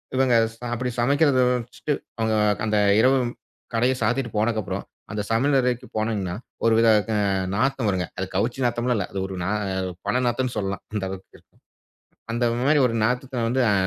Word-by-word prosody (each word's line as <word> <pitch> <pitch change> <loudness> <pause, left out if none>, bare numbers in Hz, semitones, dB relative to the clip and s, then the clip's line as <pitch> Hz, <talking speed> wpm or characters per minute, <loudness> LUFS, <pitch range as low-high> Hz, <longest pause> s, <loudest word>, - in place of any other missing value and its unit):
இவங்க 130 -1 +3 0.2
ச - - -25
அப்படி 125 +1 -2
சமைக்கிறதை 140 0 +3
வச்சுட்டு, 125 +5 -3 0.2
அவங்க 110 -1 0 0.3
க - - -3
அந்த 105 0 +1 0.2
இரவு 130 +3 +5 0.6
கடையை 125 +3 +2
சாத்திட்டு 120 +2 0
போனதுக்கப்பறம், 110 -2 -1 0.3
அந்த 105 - -2
சமையல் 135 +5 +3
அறைக்கு 125 0 -1
போனீங்கன்னா, 105 -5 -1 0.3
ஒரு 115 - +5
வித 115 - +4 0.2
க - - 0 0.4
நாத்தம் 130 0 +1
வருங்க. 95 -2 0
அது 95 - -1
கவுச்சி 120 +6 0
நாத்தம்ல்லாம் 120 0 0
இல்லை. 100 - -2
அது 95 - -3
ஒரு 95 - -6
ந 85 - -2 0.6
பிணம் 125 - +2
நாத்தம்ன்னு 125 +1 -1
சொல்லலாம். 95 -1 -2
அந்த 105 -2 -2
அளவுக்கு 95 0 -9
இருக்கும். - - -33 0.7
அந்த 120 +1 +1 0.2
மாதிரி 150 -1 +5
ஒரு 115 - -3
நாத்தத்தை 125 +2 -1
வந்து 130 +2 +1
அ - - +3
120 Hz, 175 wpm, -24 LUFS, 110-130 Hz, 0.7 s, இரவு